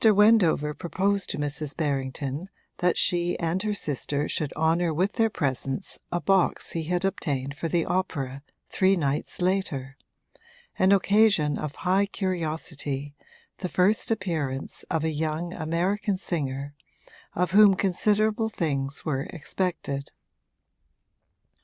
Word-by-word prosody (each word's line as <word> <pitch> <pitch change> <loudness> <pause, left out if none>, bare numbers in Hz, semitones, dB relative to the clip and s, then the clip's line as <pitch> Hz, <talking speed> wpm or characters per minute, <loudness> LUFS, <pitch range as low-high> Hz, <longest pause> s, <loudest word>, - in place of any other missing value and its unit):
Wendover 210 -8 +5
proposed 195 +4 -1
to - - -3
Mrs. 145 0 -3
Berrington 140 +2 -2 0.3
that 180 -1 +2
she 175 -1 +2
and 170 +2 -1
her 210 0 -1
sister 145 -3 -1
should 150 -3 -2
honour 165 +2 +2
with 185 +6 0
their 225 0 +2
presence 135 - -2
a 175 - 0
box 190 0 +2
he 165 -1 -3
had 180 +3 0
obtained 140 -7 -2
for 155 +3 -3
the 165 0 +1
opera 140 -8 -2 0.3
three 190 0 +3
nights 150 +1 -2
later 145 -8 -1 0.8
an 190 +1 +5
occasion 200 -6 +4
of 150 -2 -4
high 195 +2 +3
curiosity, 155 -7 -3 0.5
the 180 - -3
first 190 +5 +2
appearance 160 -11 -2
of 160 -2 0
a 160 - +1
young 160 +3 -2
American 185 +5 0
singer 140 -6 -3 0.6
of 180 +1 +1
whom 205 0 +7
considerable 210 +4 +1
things 140 -8 -2
were 135 -4 -1
expected. 160 -4 -3
170 Hz, 125 wpm, -26 LUFS, 145-190 Hz, 0.8 s, whom